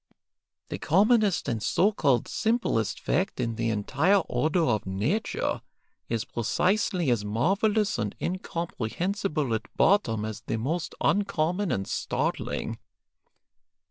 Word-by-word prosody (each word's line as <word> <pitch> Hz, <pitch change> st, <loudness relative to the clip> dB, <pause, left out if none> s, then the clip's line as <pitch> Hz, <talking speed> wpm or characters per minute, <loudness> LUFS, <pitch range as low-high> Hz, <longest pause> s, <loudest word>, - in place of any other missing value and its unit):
The -, -, -4 dB
commonest 205 Hz, +3 st, +3 dB
and 115 Hz, -3 st, -1 dB
so 195 Hz, -, +3 dB
called 140 Hz, -, +1 dB
simplest 220 Hz, -, 0 dB
fact 190 Hz, -4 st, -1 dB
in 115 Hz, -2 st, -1 dB
the 115 Hz, 0 st, -1 dB
entire 140 Hz, -, +2 dB
order 160 Hz, +1 st, 0 dB
of 110 Hz, -9 st, 0 dB
nature 105 Hz, -, -1 dB, 0.5 s
is 115 Hz, -1 st, -1 dB
precisely 180 Hz, -, +1 dB
as 115 Hz, -4 st, +1 dB
marvellous 195 Hz, -, +1 dB
and 105 Hz, -1 st, -2 dB
incomprehensible 170 Hz, -, -2 dB
at 110 Hz, -, -5 dB
bottom 115 Hz, -, +3 dB
as 110 Hz, -1 st, -5 dB
the -, -, -3 dB
most 150 Hz, +8 st, -2 dB
uncommon 190 Hz, -1 st, +1 dB
and 95 Hz, 0 st, -1 dB
startling. -, -, -2 dB
155 Hz, 115 wpm, -27 LUFS, -, 0.5 s, commonest